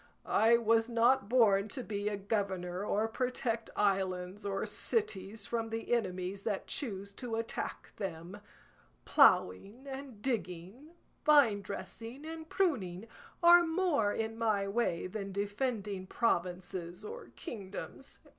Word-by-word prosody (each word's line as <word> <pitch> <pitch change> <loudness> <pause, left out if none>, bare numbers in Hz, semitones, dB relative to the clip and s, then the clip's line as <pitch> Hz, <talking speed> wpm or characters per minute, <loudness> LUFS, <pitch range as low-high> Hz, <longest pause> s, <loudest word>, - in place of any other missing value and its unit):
I 230 +2 +5
was 225 0 +3
not 235 -2 +3
born 215 -5 +4
to 250 +4 -5
be 205 -1 -2
a 205 - -3
governor 195 -3 -2
or 210 +1 +1
protect 235 -1 -2
islands 190 -1 0
or 195 -1 -1
cities 215 - -1
from 230 -1 -2
the 225 +1 -2
enemies 190 -3 -1
that 205 -2 -2
choose 200 -7 -4
to 235 +1 -4
attack 225 0 -4
them. 190 0 -6 0.6
Ploughing 200 - +4
and 270 -4 -7
digging, 220 - -4 0.3
vinedressing 230 -1 +2
and 320 0 -7
pruning, 220 - 0 0.4
are 345 0 +9
more 325 - +1
in 225 +1 -3
my 210 -3 +1
way 195 -5 0
than 195 +1 -5
defending 205 -1 -2
provinces 180 -4 -1
or 465 +3 -7
kingdoms. 205 - -7
215 Hz, 120 wpm, -33 LUFS, 195-245 Hz, 0.6 s, are